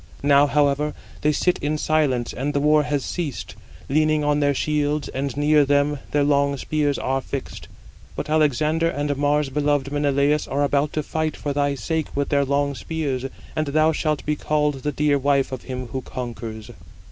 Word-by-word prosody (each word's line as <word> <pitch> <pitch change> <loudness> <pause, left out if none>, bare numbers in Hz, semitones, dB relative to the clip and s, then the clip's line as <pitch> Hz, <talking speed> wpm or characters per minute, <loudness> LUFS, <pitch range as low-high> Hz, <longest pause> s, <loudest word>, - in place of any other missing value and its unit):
Now, 145 0 +5
however, 145 +1 +1 0.3
they 150 - +3
sit 180 +4 +1
in 150 +1 -1
silence 145 -6 +1
(and 145 +4 -3
the - - +3
war 150 +1 +4
has 145 -2 -2
ceased), 160 -7 -4 0.3
leaning 155 +1 +2
on 145 0 +2
their 145 -1 +2
shields, 150 +1 0
and 135 0 -3
near 150 0 +4
them 145 +1 +1
their 145 -1 +2
long 140 -1 +2
spears 145 0 0
are 135 +1 -1
fixed. 135 0 -6 0.5
But - - -4
Alexander 155 +2 +2
and 145 -2 -1
Mars 145 0 +1
beloved 145 0 0
Menelaus 145 0 +1
are 140 +1 0
about 145 +1 +1
to 155 - -1
fight 155 +1 -2
for 145 - -3
thy 145 0 +1
sake 160 +5 -2
with 140 0 -1
their 140 -2 +2
long 140 +1 0
spears, 140 -3 -3 0.3
and 155 -1 -1
thou 155 +2 +3
shalt 155 -2 -1
be 150 - 0
called 150 -2 0
the 150 - -1
dear 145 0 +1
wife 140 0 +1
of 130 - -6
him 130 -1 -5
who 130 +3 -4
conquers." 115 -4 -7
145 Hz, 180 wpm, -23 LUFS, 140-150 Hz, 0.5 s, Now